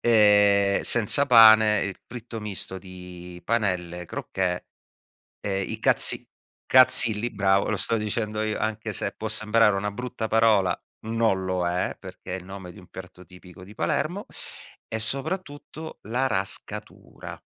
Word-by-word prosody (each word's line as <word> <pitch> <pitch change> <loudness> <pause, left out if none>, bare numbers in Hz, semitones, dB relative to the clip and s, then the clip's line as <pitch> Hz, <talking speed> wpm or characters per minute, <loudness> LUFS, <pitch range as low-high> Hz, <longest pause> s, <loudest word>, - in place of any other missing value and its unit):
ehm, 105 -3 +3
senza 120 +5 +5
pane 110 -4 +6
il 95 - -4
fritto 120 -1 -9
misto 95 -2 -5
di 90 -1 -11
panelle 90 -6 -2
crocche 90 0 -4 0.7
ehm, 95 -1 -3
i - - -5
cazzi - - +3 0.4
cazzilli. 120 -3 +5
Bravo, 100 -2 0
lo 105 - -1
stavo 110 +3 -1
dicendo 105 0 -3
io 110 -1 -3
anche 110 0 -4
se - - -3
può 110 - -6
sembrare 110 -1 +2
una 105 +1 -3
brutta 125 +1 -6
parola, 110 -4 +2 0.3
non 110 -4 -1
lo 95 -1 -2
è, 90 +1 -2
perché - - -11
è - - -4
il 90 - -13
nome 95 -1 -10
di 105 - -15
un 90 - -19
piatto 95 -1 -12
tipico 90 0 -16
di 100 +3 -14
Palermo 175 - -3 0.6
e 110 - -4
soprattutto 150 - -4
la 125 +4 -1
rascatura. 95 -4 -6
105 Hz, 145 wpm, -24 LUFS, 95-115 Hz, 0.7 s, pane